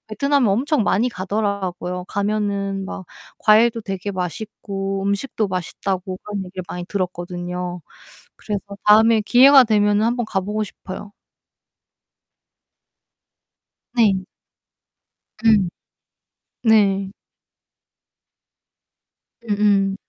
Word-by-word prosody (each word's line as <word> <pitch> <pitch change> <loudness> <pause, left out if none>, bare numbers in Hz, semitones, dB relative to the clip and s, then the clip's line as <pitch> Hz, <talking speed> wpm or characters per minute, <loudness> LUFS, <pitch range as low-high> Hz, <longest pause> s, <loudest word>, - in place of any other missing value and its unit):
베트남에 280 +3 +1
엄청 260 +6 +1
많이 215 +5 +2
가더라고요. 185 -3 -3
가면은 200 -1 -1
막 190 -2 -7 0.3
과일도 225 +2 +4
되게 195 0 -4
맛있고 195 +1 -4
음식도 200 +1 -1
맛있다고 185 +1 -3
그런 205 -2 -4
얘기를 185 0 -7
많이 175 0 -5
들었거든요. 180 -1 -4 0.6
그래서 205 -2 -4 0.3
다음에 220 +1 +6
기회가 260 +4 +7
되면은 210 -1 +2
한번 240 -1 -1
가보고 210 +2 -2
싶어요. 200 +1 -10 2.8
네. 200 -5 +3 1.2
음. 205 -5 +4 0.9
네. 200 -4 +3 2.4
음음. 200 -2 +2
200 Hz, 205 characters per minute, -21 LUFS, 190-215 Hz, 2.8 s, 기회가